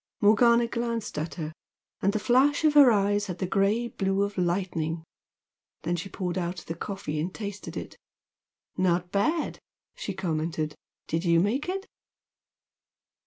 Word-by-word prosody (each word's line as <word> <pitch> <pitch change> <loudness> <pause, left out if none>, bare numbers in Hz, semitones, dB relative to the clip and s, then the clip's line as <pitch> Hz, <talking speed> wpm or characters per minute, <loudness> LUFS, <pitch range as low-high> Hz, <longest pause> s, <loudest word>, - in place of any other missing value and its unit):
Morgana 235 +3 +5
glanced 235 -6 -2
at 160 +2 -4
her, 160 -3 -5 0.5
and 195 - +3
the 215 - 0
flash 260 +7 +3
of 305 -1 +5
her 285 -4 +8
eyes 205 0 +2
had 180 -2 -4
the 185 - -1
grey 200 +6 +2
blue 195 -3 0
of 200 0 -3
lightning. 170 -3 -1 0.8
Then 175 - 0
she 180 +3 -5
poured 185 -2 -2
out 175 +1 -3
the 165 - -3
coffee 170 -3 -4
and 170 +5 -2
tasted 205 0 -6
it. - - -6 0.8
"Not 180 -1 +1
bad!" 300 +12 0 0.3
she 200 - -5
commented 160 -4 -2 0.3
"Did 165 +1 -1
you 170 -2 +4
make 235 - 0
it?" 385 +1 -2
195 Hz, 150 wpm, -27 LUFS, 175-230 Hz, 0.8 s, her